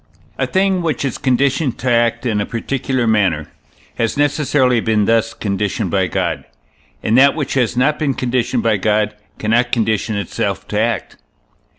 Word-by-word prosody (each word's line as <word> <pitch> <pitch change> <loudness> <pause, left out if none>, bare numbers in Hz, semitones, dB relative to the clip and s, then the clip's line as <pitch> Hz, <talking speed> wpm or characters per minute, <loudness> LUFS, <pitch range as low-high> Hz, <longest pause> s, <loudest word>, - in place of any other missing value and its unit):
A - - +1
thing 190 -1 +1
which 155 -5 -1
is 135 - -3
conditioned 135 +1 +1
to 130 0 -1
act 115 0 +1
in 110 -4 0
a - - -1
particular 130 +1 -2
manner, 95 -9 +1 0.5
has 115 +4 0
necessarily 145 -4 +2
been 110 -2 +1
thus 115 +1 +1
conditioned 100 -2 -2
by 95 -2 +1
God; - - -2 0.6
and 110 - +1
that 140 +1 +5
which 145 -4 -3
has 125 -3 0
not 150 +4 +2
been 140 -4 0
conditioned 125 -1 -1
by 110 -2 +2
God 105 +1 +1 0.2
cannot 120 +3 +1
condition 110 -2 0
itself 100 -4 -3
to 105 - -1
act. 115 -1 -1
115 Hz, 165 wpm, -18 LUFS, 110-135 Hz, 0.6 s, that